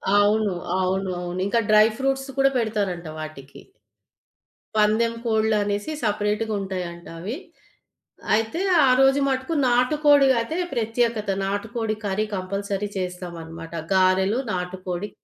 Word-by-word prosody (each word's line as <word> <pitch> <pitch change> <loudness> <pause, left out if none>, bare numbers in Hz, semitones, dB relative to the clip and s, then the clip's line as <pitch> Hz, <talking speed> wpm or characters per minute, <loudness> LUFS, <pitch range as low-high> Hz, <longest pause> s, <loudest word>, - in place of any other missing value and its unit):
అవును. 205 0 +3 0.3
అవును 190 +1 0
అవును. 175 0 -5
ఇంకా 215 +4 +2
డ్రై 215 0 +7
ఫ్రూట్స్ 270 0 -1
కూడా 275 0 +5
పెడతారంట 200 -7 -1
వాటికి. 145 -3 -9 1.2
పందెం 220 +2 +3
కోడలనేసి 215 +1 +1
సెపరేట్‌గా 210 +1 0
ఉంటాయంట 180 -3 -5
అవి. 210 - -4 1.0
అయితే 225 +10 -1 0.2
ఆ - - +3
రోజు 270 +1 +5
మటుకు 265 +4 -1
నాటుకోడి 285 +3 +4
అయితే 230 +8 -3 0.2
ప్రత్యేకత. 230 -2 0 0.2
నాటుకోడి 215 +2 -2
కర్రీ 200 +2 0
కంపల్సరీ 200 +2 -3
చేస్తామనమాట. 170 -3 -6 0.2
గారెలు, 190 +4 +3
నాటుకోడి 180 +1 -4
210 Hz, 105 wpm, -24 LUFS, 185-230 Hz, 1.2 s, డ్రై